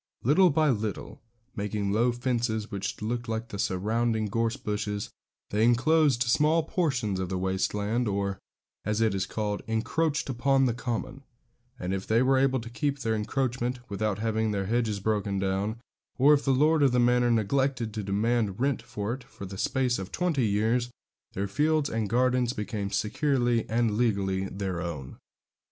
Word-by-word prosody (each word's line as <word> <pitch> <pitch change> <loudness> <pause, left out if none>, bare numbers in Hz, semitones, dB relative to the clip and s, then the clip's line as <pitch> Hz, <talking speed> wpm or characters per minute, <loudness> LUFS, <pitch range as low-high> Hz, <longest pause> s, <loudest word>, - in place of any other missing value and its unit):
Little 165 +9 +5
by 155 -1 +3
little, 110 -3 -4 0.3
making 100 -2 -2
low 115 +4 +3
fences 120 -3 -1
which 100 +1 -4
looked 120 +1 -3
like 115 +1 -3
the 100 - -6
surrounding 110 +4 0
gorse 115 +4 0
bushes, 105 -4 -3 0.4
they 105 +2 +2
enclosed 130 +2 +4
small 150 +7 +3
portions 130 - -1
of 95 -1 -3
the 95 - -2
waste 95 +2 -1
land, 110 +4 0
or, 100 -1 -1 0.4
as 105 +1 -1
it 110 -2 +2
is 95 0 -1
called, 105 -2 -2
encroached 145 +8 0
upon 135 +1 +2
the 120 - +1
common; 125 +2 -4 0.6
and 90 +1 -2
if 95 0 -3
they 115 +3 +3
were 130 0 +3
able 135 -1 +2
to 115 - -8
keep 140 +2 -1
their 115 -5 -1
encroachment 125 +2 -1
without 105 0 -1
having 110 0 0
their 100 -2 -1
hedges 110 -1 0
broken 100 -1 -1
down, 100 +3 -1 0.4
or 140 +3 +6
if 145 - +2
the 135 - +3
lord 150 +4 +3
of 135 -3 +4
the 125 - +3
manor 120 0 +3
neglected 120 +1 +1
to 110 - -3
demand 105 +1 0
rent 135 0 +1
for 105 +2 -4
it 130 0 -7
for 125 -5 -10
the 95 +1 -7
space 125 +3 0
of 95 0 -6
twenty 165 -10 +1
years, 110 +4 +1 0.4
their 100 +1 -2
fields 150 +6 +1
and 110 -2 -1
gardens 125 +1 +2
became 105 -2 -3
securely 120 +3 0
and 115 -2 +1
legally 100 -5 +1
their 95 -3 -3
own. 75 -7 -6
115 Hz, 175 wpm, -28 LUFS, 105-130 Hz, 0.6 s, or